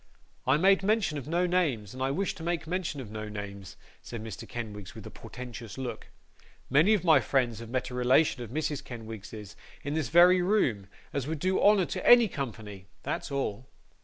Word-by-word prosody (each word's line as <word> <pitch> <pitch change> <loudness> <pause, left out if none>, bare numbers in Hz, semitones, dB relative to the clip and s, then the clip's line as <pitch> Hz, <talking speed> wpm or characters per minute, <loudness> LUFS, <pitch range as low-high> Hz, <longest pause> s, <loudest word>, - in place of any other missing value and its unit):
'I 130 +3 +5
made 195 +4 +4
mention 195 -7 +1
of 140 - -10
no 175 +3 +1
names, 150 - 0
and 130 - -8
I 135 - +1
wish 190 +8 -1
to - - -12
make 170 0 -2
mention 170 -3 -3
of 110 -5 -9
no 110 0 -5
names,' 100 -2 -8 0.2
said 115 -2 -7
Mr. 110 -3 -8
Kenwigs, 105 -5 -7
with - - -10
a - - -8
portentous 115 -3 -9
look. 130 -2 -5 0.6
'Many 160 +11 +5
of 200 - -2
my 160 -5 +6
friends 125 -5 0
have 115 -1 -9
met 130 0 -2
a - - -7
relation 125 +2 +3
of 120 - -6
Mrs. 145 +1 -2
Kenwigs's 110 -4 -9 0.3
in 145 - -3
this 155 -6 -1
very 180 +2 +6
room, 135 - +1 0.3
as 140 -1 -2
would 160 +1 -2
do 185 +5 0
honour 205 -3 +5
to - - -5
any 240 -2 +7
company; 110 - -6 0.2
that's - - -3
all. 130 -3 -3
135 Hz, 195 wpm, -29 LUFS, 110-175 Hz, 0.6 s, any